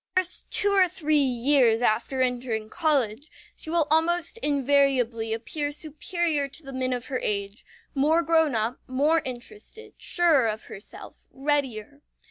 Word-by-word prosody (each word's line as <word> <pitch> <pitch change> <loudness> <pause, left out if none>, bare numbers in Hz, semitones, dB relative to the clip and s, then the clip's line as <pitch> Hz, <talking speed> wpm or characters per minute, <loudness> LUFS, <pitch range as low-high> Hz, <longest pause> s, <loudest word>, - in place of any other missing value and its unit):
In - - +7
the - - -4
first 360 - -5
two 405 -1 +2
or 385 -2 +5
three 310 -2 +1
years 245 -2 +3
after 245 +4 +1
entering 240 -3 -2
college, 290 -5 0 0.3
she - - -10
will 330 -1 +2
almost 340 +5 +1
invariably 270 - +1
appear 290 +6 -3
superior 310 0 -1
to 275 +4 -12
the 270 -1 -9
men 255 0 -1
of 245 -1 -3
her 260 -3 -3
age, 200 +1 -3 0.3
more 310 +4 +2
grown 320 -5 +2
up, 225 +3 -1
more 295 +5 +2
interested, 295 - -8
surer 325 -9 +3
of 220 0 -3
herself, 200 - -11
readier. 280 -2 -2
280 Hz, 150 wpm, -26 LUFS, 240-315 Hz, 0.3 s, In